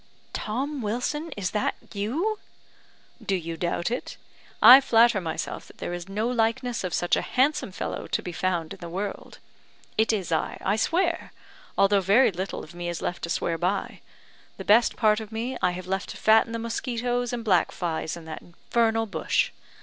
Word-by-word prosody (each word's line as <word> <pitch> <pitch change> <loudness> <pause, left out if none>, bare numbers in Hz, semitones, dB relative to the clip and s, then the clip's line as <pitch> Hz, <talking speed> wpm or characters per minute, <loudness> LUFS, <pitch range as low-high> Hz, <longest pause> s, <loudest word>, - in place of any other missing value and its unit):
"Tom 270 +6 -3
Wilson, 250 +9 -2
is 185 -3 -2
that 210 - 0 0.2
you?" 300 - -1 0.8
"Do 195 - 0
you 165 -2 -4
doubt 170 +4 -1
it? 245 - -4 0.4
I 250 +5 +10
flatter 230 -5 +4
myself 160 -2 -4
that - - -17
there - - -4
is 175 +1 -6
no 210 +4 -1
likeness 240 0 0
of 180 -3 -2
such 175 - +2
a - - 0
handsome 265 -4 +1
fellow - - -4
to - - -1
be 180 - -5
found 170 -2 -1
in - - -12
the 170 - -7
world. 195 +3 -5 0.6
It 220 - +4
is 195 -6 -2
I, 160 - 0
I 195 - +2
swear! 335 +8 0 0.5
although 200 0 +4
very 205 +7 +5
little 185 +2 -4
of 155 - -12
me 175 0 -4
is 170 - -4
left 175 - -3
to - - -8
swear 165 0 -1
by. 190 +3 -2 0.6
The - - -7
best 230 +3 +5
part 215 -2 +3
of 220 -1 -8
me 235 +4 -3
I - - +3
have 180 0 -6
left 190 +1 -2
to - - -7
fatten 220 +1 +4
the 230 - -2
mosquitoes 240 +1 -2
and 235 -2 -4
black 185 -5 +3
flies 165 -2 -3
in 165 - -11
that 160 - -7
infernal 225 +5 0
bush. 205 - 0
210 Hz, 190 wpm, -26 LUFS, 180-240 Hz, 0.8 s, I